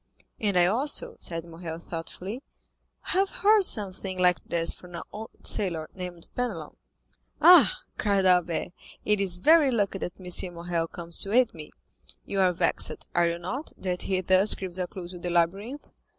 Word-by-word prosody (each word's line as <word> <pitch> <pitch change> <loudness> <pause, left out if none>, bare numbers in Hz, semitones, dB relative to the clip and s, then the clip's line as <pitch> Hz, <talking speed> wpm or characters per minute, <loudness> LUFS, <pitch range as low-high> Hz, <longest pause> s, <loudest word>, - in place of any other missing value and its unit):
"And 200 -4 0
I 175 - +5
also," 290 - +3
said 165 -1 -3
Morrel 165 -1 -7
thoughtfully, 180 +7 -7 0.6
"have 385 +1 +1
heard 415 +1 +3
something 190 - -1
like 180 -1 +3
this 165 -1 -1
from 175 -1 -12
an 170 - -5
old 220 +1 -10
sailor 170 -6 0
named 180 -2 -8
Penelon." 205 -12 -4 0.6
"Ah," 315 - +7 0.2
cried 200 -2 +1
Albert, 180 -2 +2 0.4
"it 210 -1 +2
is 180 -2 -1
very 315 - +5
lucky 205 -5 0
that 175 - -6
M. 180 0 -2
Morrel 170 -1 -2
comes 170 0 -5
to 195 - +1
aid 245 0 +3
me; 155 -2 -9 0.6
you 200 - -3
are 185 -1 +4
vexed, 175 - -1
are 175 -1 +3
you 170 - -3
not, 260 - -6
that 180 -1 -3
he 185 -1 -1
thus 185 +3 +4
gives 185 -1 -6
a 180 - -1
clew 180 -1 -8
to 180 0 -9
the 175 - -4
labyrinth?" 195 - -1
185 Hz, 170 wpm, -26 LUFS, 175-210 Hz, 0.6 s, Ah